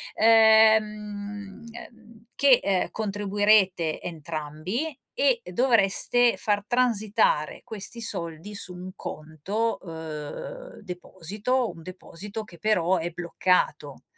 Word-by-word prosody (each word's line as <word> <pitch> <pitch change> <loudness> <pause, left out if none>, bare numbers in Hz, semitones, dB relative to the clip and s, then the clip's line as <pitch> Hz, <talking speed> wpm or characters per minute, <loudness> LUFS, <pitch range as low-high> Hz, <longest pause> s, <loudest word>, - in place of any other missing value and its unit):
ehm, 215 -2 +3
ehm, 230 -1 -14
che, 275 -3 +6
ehm, 190 -2 0
contribuirete 205 -5 +1
entrambi 165 - -5 0.2
e - - +3
dovreste 240 0 +3
far 205 -1 0
transitare 220 -10 +1
questi 220 +2 -8
soldi 170 -2 -5
su 190 -3 -7
un 180 +1 -8
conto, 175 +11 -3
uhm, 165 - -8
deposito, 205 +6 -3
un 165 -1 -13
deposito 185 +4 -8
che 175 -5 -15
però 190 -4 +2
è 170 0 -2
bloccato, 170 -4 -1
205 Hz, 95 wpm, -26 LUFS, 175-225 Hz, 0.2 s, che